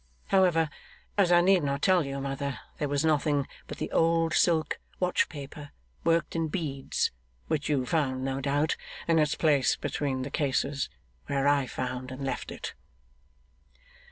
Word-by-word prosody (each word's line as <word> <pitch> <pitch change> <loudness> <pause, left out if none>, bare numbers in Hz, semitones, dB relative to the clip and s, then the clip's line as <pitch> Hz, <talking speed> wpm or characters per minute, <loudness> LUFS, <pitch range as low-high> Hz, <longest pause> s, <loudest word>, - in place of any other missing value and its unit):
However, 175 -5 +4 0.4
as 195 -4 +3
I 175 0 +7
need 185 0 +5
not 140 0 -1
tell 185 -3 +5
you, 140 0 -3
mother, 140 0 -3 0.2
there 145 - -1
was 145 +2 +1
nothing 145 -2 +2 0.2
but - - -7
the - - -4
old 165 0 +3
silk 165 -3 +2 0.2
watch 180 -1 +2
paper 145 -1 -8 0.3
worked 165 0 +2
in 165 -1 +1
beads, 150 -5 -1 0.3
which 155 -2 -1
you 135 -4 +1
found 130 -3 0
(no 135 0 -2
doubt) 145 +3 +1 0.3
in 165 -1 +4
its 150 -1 +2
place 145 -5 +3
between 135 -3 -2
the 135 - -5
cases, 140 -1 0 0.4
where 140 0 +1
I 140 -2 +3
found 130 +1 -4
and 135 +1 -5
left 135 - -3
it. - - -6
145 Hz, 155 wpm, -28 LUFS, 135-165 Hz, 0.4 s, I